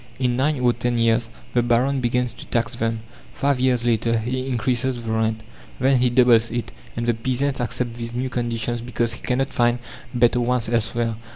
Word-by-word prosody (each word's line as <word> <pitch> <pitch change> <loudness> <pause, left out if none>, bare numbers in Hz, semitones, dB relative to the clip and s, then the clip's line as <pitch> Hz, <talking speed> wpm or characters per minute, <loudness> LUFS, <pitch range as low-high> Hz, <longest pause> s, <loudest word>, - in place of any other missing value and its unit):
In 125 -2 +1
nine 140 +2 +1
or 120 -1 +4
ten 120 +1 -1
years 115 0 +2 0.2
the 120 - +3
baron 125 +3 +2
begins 125 0 0
to - - -11
tax 120 +1 0
them. 115 -1 -1 0.3
Five 140 -2 +1
years 125 -2 +2
later 115 0 +2
he 130 +4 -2
increases 125 +1 0
the 110 - -2
rent. 110 0 0 0.4
Then 130 +1 +4
he 125 0 +3
doubles 120 -2 +5
it, 120 0 -3 0.3
and 115 - -1
the 120 - +2
peasant 130 +4 -1
accepts 120 0 -3
these 115 0 -5
new 130 +2 -1
conditions 120 -1 -2
because 120 -1 -1
he - - -10
cannot 135 +2 -1
find 120 0 +2 0.3
better 120 -1 +3
ones 120 -1 0
elsewhere. 115 0 0
120 Hz, 190 wpm, -22 LUFS, 115-125 Hz, 0.4 s, doubles